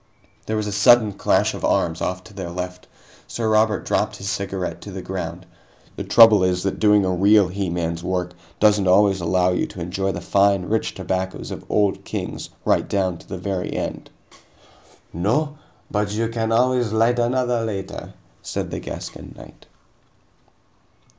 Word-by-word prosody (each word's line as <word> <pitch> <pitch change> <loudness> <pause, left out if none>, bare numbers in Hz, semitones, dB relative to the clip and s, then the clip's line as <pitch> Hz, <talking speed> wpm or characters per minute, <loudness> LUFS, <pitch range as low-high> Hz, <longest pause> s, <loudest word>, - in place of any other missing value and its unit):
There 110 - -1
was 105 - -1
a 105 - -3
sudden 105 +2 +5
clash - - +1
of - - -8
arms 85 0 +1
off 90 0 -2
to 105 - -15
their 95 -3 -6
left. 90 +1 -6 0.4
Sir 115 -2 -3
Robert 110 -2 +2
dropped - - 0
his 100 0 -4
cigarette 95 -1 -4
to 100 - -9
the 95 -1 -7
ground. 90 -1 -5 0.5
"The - - -4
trouble 110 -4 +7
is 90 -1 +1
that 95 - -2
doing 105 -2 +4
a 95 - +1
real 100 +1 +4
he 95 0 -3
man's 85 -1 -3
work 90 -1 -2 0.3
doesn't 105 -2 +4
always 95 0 +4
allow 90 +2 +2
you 90 - 0
to - - -10
enjoy 95 +3 -2
the 85 - -5
fine, 100 +1 +2
rich 110 +3 -1
tobaccos 95 0 -3
of - - -7
Old 105 -2 +1
Kings - - -5 0.2
right - - +1
down 95 -4 0
to - - -17
the 95 - -4
very 95 0 -3
end." - - -4 1.0
"No, 145 - -1 0.3
but 105 -1 -1
you 115 +1 -1
can 115 -1 -2
always 125 -1 +2
light 115 +2 +2
another 120 -1 +1
later," 100 -4 -5 0.3
said - - -4
the - - -3
Gascon - - -8
knight. - - -15
100 Hz, 170 wpm, -22 LUFS, 90-110 Hz, 1.0 s, trouble